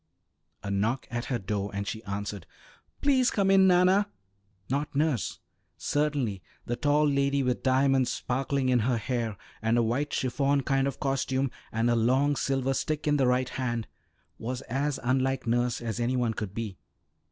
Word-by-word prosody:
A 100 - -3
knock 110 +7 0
at 120 0 -2
her 125 - -1
door, 100 0 -3
and 100 0 -2
she 110 +2 -4
answered, 100 -2 -5 0.6
"Please 260 -3 +4
come 195 -2 +2
in, 190 -1 +6
Nanna!" 185 +3 +4 0.6
Not 140 +2 -2
nurse. 145 - 0 0.4
Certainly 140 -9 -1 0.2
the 120 - -1
tall 150 +3 +2
lady 140 0 +2
with 125 -1 0
diamonds 130 0 +3
sparkling 135 +1 -1
in 125 -1 +4
her 120 +2 +1
hair, 115 -2 -2 0.2
and 115 +2 +2
a 120 - +4
white 130 +6 0
chiffon 140 +2 +1
kind 135 +1 +1
of 140 - -4
costume, 135 -1 0 0.2
and 115 +1 +1
a 120 - +3
long 130 +5 +3
silver 135 -1 0
stick 155 +3 -2
in 150 0 +3
the 135 -3 +3
right 125 +1 +2
hand, 120 -3 -2 0.5
was 125 +3 -4
as 140 +3 -2
unlike 130 +1 +1
nurse 120 +1 +1
as 115 -1 -3
any 120 +2 0
one 120 -3 +1
could 105 -3 -5
be. 110 -5 -5
130 Hz, 170 wpm, -28 LUFS, 115-140 Hz, 0.6 s, in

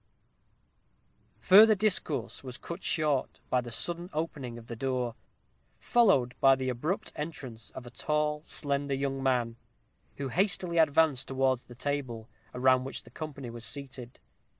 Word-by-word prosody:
Further 215 +3 +8
discourse 185 -10 0
was 130 -1 -7
cut 170 +2 -7
short 150 -6 0
by 125 - +3
the 120 -1 -8
sudden 175 +8 0
opening 150 -6 -4
of 115 - -11
the 115 - -7
door, 125 -1 -1 0.6
followed 195 - +3
by 135 -1 +6
the 130 -1 -2
abrupt 150 - -2
entrance 140 -8 -6
of 125 - -7
a 120 - -10
tall, 150 +2 -1
slender 140 -1 -2
young 135 0 -2
man, 120 -3 0 0.6
who 140 -1 -4
hastily 180 - +1
advanced 155 -3 +3
towards 130 -1 +1
the 120 - -13
table, 130 -5 -3 0.2
around 130 0 +3
which 135 - -5
the - - -16
company 140 -6 -7
were 120 - -8
seated. 130 0 -4
135 Hz, 145 wpm, -30 LUFS, 125-155 Hz, 0.6 s, Further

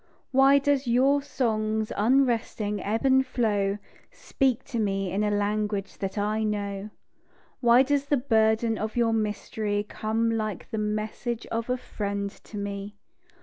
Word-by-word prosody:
Why 270 +1 +6
does 280 -2 +1
your 270 +4 +3
song's 220 -5 -1
unresting 225 -3 +1
ebb 220 +5 -1
and 265 0 +5
flow 205 -6 0 0.3
Speak 260 -4 0
to 240 -4 -4
me 195 -3 -1
in 200 +3 0
a 210 - +1
language 205 -1 -1
that 195 +1 -4
I 210 +2 0
know? 205 -1 -3 0.7
Why 240 +1 +6
does 285 +1 0
the 285 0 +2
burden 225 -2 +2
of 215 0 -3
your 235 -2 +2
mystery 210 -1 -1
Come 225 +2 -1
like 215 -4 -3
the 220 - -2
message 215 +2 -3
of 230 +1 -2
a 250 - +1
friend 200 -4 -4
to 210 - -12
me? 200 0 -5
220 Hz, 150 wpm, -26 LUFS, 205-245 Hz, 0.7 s, Why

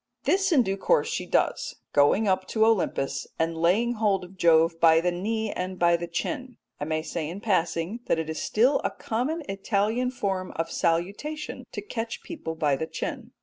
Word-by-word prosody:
This 385 +7 +2
in 275 -7 +5
due 195 -2 -2
course - - +2
she - - -3
does, - - 0 0.2
going 145 +9 +4
up 185 -1 +1
to 220 -1 +2
Olympus 165 -10 0
and 165 0 0
laying 190 +9 +2
hold 210 -4 +1
of 180 +2 -12
Jove 165 -1 +4
by 165 -1 +6
the 180 +2 +1
knee 215 +4 -2
and 185 +1 -4
by 170 -1 +4
the 170 0 -3
chin. 255 - -4 0.2
I 145 - -2
may 155 0 -1
say 155 -1 -4
in 180 +4 -6
passing 185 0 0
that - - +2
it 160 -1 -2
is 160 0 -4
still 250 +6 +3
a - - +1
common 275 +9 -2
Italian 210 +5 0
form 190 -7 -3
of 165 0 -2
salutation 200 - -2
to - - -5
catch 230 - -5
people 220 - -6
by 150 -3 +2
the 160 - -3
chin. - - -5
190 Hz, 190 wpm, -26 LUFS, 165-230 Hz, 0.2 s, by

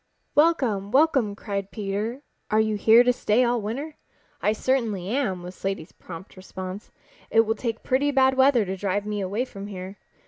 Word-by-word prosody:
"Welcome! 265 -11 +2
Welcome!" 265 -5 +3
cried 200 -2 -4
Peter. 215 +6 -4 0.3
"Are 215 - +3
you 220 -1 +1
here 225 +3 +6
to 250 0 +3
stay 235 +1 +2
all 240 -1 +1
winter?" 275 +9 -5 0.4
"I 210 - +2
certainly 220 -5 -1
am," 210 -8 -1
was 180 +1 -8
Slaty's 195 -4 -4
prompt 175 +1 -11
response. 185 +1 -8 0.4
"It 225 - +5
will 220 0 0
take 230 -1 -4
pretty 270 +3 +1
bad 265 -2 +4
weather 260 -4 +4
to 190 0 -3
drive 200 +1 -2
me 210 -1 -2
away 200 +6 -1
from 200 -5 -9
here. 190 0 -8
215 Hz, 175 wpm, -25 LUFS, 195-255 Hz, 0.4 s, here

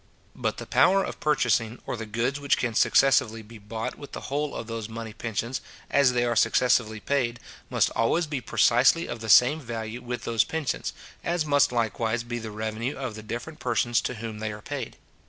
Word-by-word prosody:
But - - -2
the - - -6
power 195 +1 +4
of - - -6
purchasing, 120 -6 +1
or - - -3
the 115 -1 -6
goods 120 +6 -1
which 140 -1 +2
can 120 -2 -1
successively 115 -2 +3
be 110 +1 -13
bought 110 +4 -5
with 145 - -10
the 135 - -6
whole 145 0 -1
of - - -4
those 115 -1 -5
money 110 -1 -6
pensions, 115 +2 -3 0.3
as 140 -3 +4
they 120 0 +2
are 120 -1 0
successively 115 -1 +3
paid, 120 -1 -1 0.3
must - - +2
always 140 +9 +1
be 145 -4 -3
precisely 125 +8 +4
of 120 - -5
the 110 0 -6
same 125 +8 +6
value 115 -1 -5
with 120 0 -5
those 115 -1 +2
pensions; 160 -4 -3 0.3
as 170 -2 0
must 145 -3 +3
likewise 115 0 0
be 120 0 -4
the 110 -1 -6
revenue 110 +4 -3
of 130 -4 -4
the 110 - -8
different 120 +8 -6
persons 120 0 +1
to 125 - -3
whom 110 -1 -6
they 110 0 -3
are 105 0 -9
paid. 135 -5 -5
120 Hz, 200 wpm, -26 LUFS, 110-135 Hz, 0.3 s, same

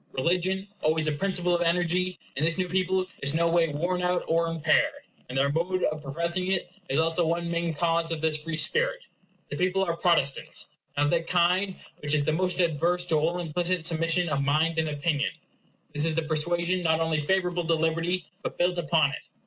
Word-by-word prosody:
Religion, 185 +7 0
always 155 0 +1
a - - +2
principle 180 +2 0
of 175 - +1
energy, 180 +1 +1 0.2
in 140 - -1
this 165 +2 +2
new 185 -1 0
people 185 +1 +1 0.2
is 140 +2 0
no 170 +1 +3
way 170 0 +3
worn 175 +5 -1
out 180 0 +1
or 165 +1 +2
impaired; 170 - +1 0.3
and 130 - -4
their 140 +1 +2
mode 180 +4 -1
of 155 0 0
professing 170 +6 -1
it 190 -2 -1 0.2
is 135 - 0
also 165 +2 +2
one 170 +1 -1
main 170 0 0
cause 165 +1 0
of 165 - -2
this 160 0 +1
free 155 +2 -4
spirit. - - 0 0.4
The - - -4
people 185 +1 +1
are 170 -3 -1
Protestants; 170 -6 +1 0.3
and 145 - +3
of 145 - +1
that 170 -1 0
kind 180 +2 +2 0.2
which 150 +1 0
is 145 - +2
the 155 - 0
most 180 +2 0
adverse 175 +1 +1
to 165 - 0
all 160 +3 +1
implicit 175 +1 -1
submission 165 +1 +1
of 145 -3 0
mind 160 +3 +1
and 160 -1 0
opinion. 145 0 -1 0.6
This 150 +1 -1
is 160 -1 0
a 165 - +1
persuasion 170 +3 0
not 160 -2 +2
only 160 -2 0
favorable 180 -2 +1
to 165 - +3
libert 165 +1 0
y, 180 -1 -1 0.2
but - - -5
built 175 0 +1
upon 160 -3 +2
it. - - -8
170 Hz, 205 wpm, -27 LUFS, 160-180 Hz, 0.6 s, no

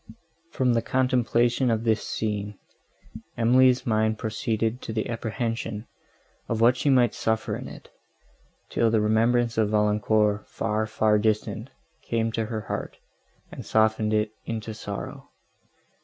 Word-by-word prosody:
From 130 -6 +1
the 115 - +2
contemplation 125 0 +1
of 115 -1 0
this 110 -2 +2
scene, 105 -2 -3 0.8
Emily's 125 +2 +4
mind 110 -1 +1
proceeded 110 +2 -2
to - - -6
the 110 -1 -2
apprehension 115 -1 -3 0.6
of 115 - -1
what 120 +2 +5
she 140 - 0
might 125 -3 +4
suffer 110 0 -1
in - - -7
it, - - -11 0.8
till 115 - +2
the 110 0 +2
remembrance 115 +2 +2
of 105 -2 +2
Valancourt, 105 0 +1
far, 110 0 -1
far 110 -1 +2
distant! 105 0 -1 0.3
came 115 -1 -1
to 110 -1 -2
her 110 -1 -3
heart, 105 - -5 0.5
and - - -8
softened 110 0 +2
it 105 0 +1 0.2
into 110 -1 -4
sorrow. 100 -1 -7
110 Hz, 135 wpm, -25 LUFS, 110-120 Hz, 0.8 s, what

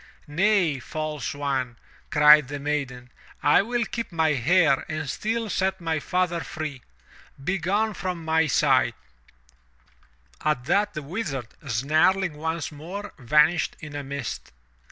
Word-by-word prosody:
*'Nay, 175 -2 +2
false 155 +2 -4
one!" 135 -4 -2 0.3
cried 150 -1 +7
the 145 +2 -5
maiden. 135 -4 -3 0.3
"I 145 - +6
will 235 +2 -1
keep 230 -2 -5
my 160 -2 +2
hair 150 +2 +3
and 155 -1 -3
still 225 - -2
set 190 -1 0
my 165 -2 -1
father 180 0 0
free! 155 -5 -6 0.6
Begone 195 +6 0
from 180 -3 -4
my 160 0 +2
sight!" 130 -3 +3 1.5
At 150 -5 0
that, 200 +5 +1
the 150 - -4
Wizard, 140 - -4 0.2
snarling 155 - +2
once 160 +1 -3
more, 185 +8 -7
vanished 150 +6 +3
in 150 -1 -9
a 145 - -4
mist. 140 -3 -5
155 Hz, 130 wpm, -25 LUFS, 140-185 Hz, 1.5 s, cried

